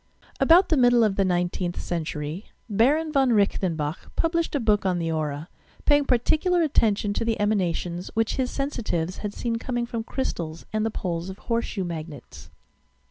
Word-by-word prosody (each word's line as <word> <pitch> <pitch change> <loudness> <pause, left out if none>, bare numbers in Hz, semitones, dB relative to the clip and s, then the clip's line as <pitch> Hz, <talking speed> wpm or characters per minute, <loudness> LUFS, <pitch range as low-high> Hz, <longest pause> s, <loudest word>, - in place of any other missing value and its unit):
About 350 +3 +6
the 315 - +3
middle 245 -2 +5
of 210 -3 +2
the 195 - +2
19th 175 -1 -1
century. 160 +1 -4 0.2
Baron 275 +9 +2
von 270 -4 +3
Reichenbach 175 -6 0
published 335 -1 0
a - - +2
book 215 -4 +2
on 185 -2 +1
the 165 -1 -1
aura, 155 -1 -3 0.4
paying 290 -1 +4
particular 315 +8 +2
atten 230 -8 +3
tion 205 0 -2
to - - -1
the 225 -1 -1
emanations 180 -4 -1
which 225 0 0
bis 255 -2 0
sensitives 220 - -2
had 210 -1 -5
seen 230 -1 -2
coming 240 0 -2
from 230 -1 -4
crystals 170 -11 -4
and 215 0 +1
the 225 - +1
poles 175 -4 -3
of 190 - -7
horseshoe 230 -3 -2
magnets. 160 -5 -8
210 Hz, 170 wpm, -25 LUFS, 175-245 Hz, 0.4 s, About